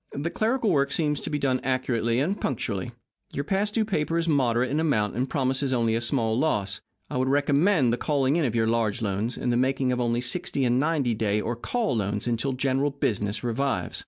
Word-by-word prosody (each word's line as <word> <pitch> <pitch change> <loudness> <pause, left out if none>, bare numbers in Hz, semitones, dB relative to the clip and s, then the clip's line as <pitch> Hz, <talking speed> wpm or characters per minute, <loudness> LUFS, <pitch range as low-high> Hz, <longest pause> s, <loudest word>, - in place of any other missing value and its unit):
The 160 +4 -2
clerical 225 -1 +1
work 140 -3 +2
seems 150 -2 +1
to - - -5
be 150 - -1
done 130 -3 +1
accurately 125 -3 0
and 180 +9 -1
punctually. 100 -6 -2 0.4
Your 140 - -2
past 200 +6 -1
due 220 -2 +2
paper 165 -5 -1
is 170 0 0
moderate 130 -4 +2
in 150 - +1
amount, 115 -10 +1
and 130 +3 -1
promises 130 0 0
only 115 -2 +1
a 115 - 0
small 115 -2 0
loss. 105 -8 0 0.3
I - - -2
would 130 +1 +1
recommend 145 - +3
the - - 0
calling 140 0 +1
in 170 - +2
of 120 -5 -1
your 115 -1 +2
large 115 0 0
loans, 105 +4 -2
and 120 - 0
the - - +2
making 130 0 +1
of 125 0 0
only 120 0 +1
sixty 135 +1 -1
and 125 +1 +2
ninety 145 -5 +1
day 105 -1 0
or 115 +3 -2
call 220 - -1
loans 100 0 -1
until 120 +3 -1
general 135 +2 +1
business 105 -7 -2
revives. 120 -6 -1
130 Hz, 215 wpm, -26 LUFS, 115-145 Hz, 0.4 s, recommend